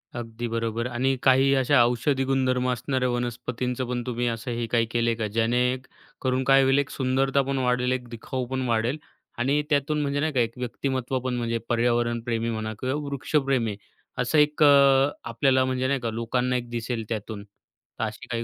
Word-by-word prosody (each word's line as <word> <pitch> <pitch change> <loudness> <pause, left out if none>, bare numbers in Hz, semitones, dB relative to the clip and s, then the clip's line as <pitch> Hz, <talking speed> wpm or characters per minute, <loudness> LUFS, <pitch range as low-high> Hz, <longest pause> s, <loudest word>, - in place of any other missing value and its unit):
अगदी 120 0 -5
बरोबर. 115 0 -2
आणि 130 +2 0
काही 135 +1 +5
अशा 135 0 +4
औषधी 125 +3 0
गुणधर्म 130 -1 +1
असणाऱ्या 125 +1 -1
वनस्पतींचं 125 +1 -3
पण 125 -1 -1
तुम्ही 120 0 -1
असं 115 +2 -3
हे 120 0 -2
काही 115 -1 +3
केलेय 115 -1 +1
का, 110 -1 -2
ज्याने 115 +3 +1 0.6
करून 130 0 0
काय 135 +1 +5
होईल 135 +1 +3
एक 140 - -1
सुंदरता 135 +1 +1
पण 135 0 -2
वाढेल, 125 -1 +1
एक 125 -1 -2
दिखाऊ 125 +2 -4
पण 130 +1 -2
वाढेल. 115 +4 0 0.4
आणि 140 +4 +1
त्यातून 150 +1 +1
म्हणजे 145 0 -1
नाही 155 +1 0
का 130 - +1
एक 115 0 0
व्यक्तिमत्त्व 130 +1 -2
पण 125 0 -3
म्हणजे 115 -1 -1
पर्यावरणप्रेमी 120 -1 0
म्हणा 110 -1 -3
किंवा 130 +2 -1
वृक्षप्रेमी 135 -5 0 0.4
असं 125 +5 +1
एक 150 0 +3
अ, 140 -1 +6 0.2
आपल्याला 130 +3 +2
म्हणजे 130 0 -1
नाही 135 0 +1
का, 120 -2 -3
लोकांना 125 +3 -1
एक 120 -1 -3
दिसेल 120 0 -3
त्यातून, 110 -2 -5
तर 100 +2 -12
अशी 110 -1 -5
काही 115 -1 -2
125 Hz, 180 wpm, -25 LUFS, 115-135 Hz, 0.6 s, अ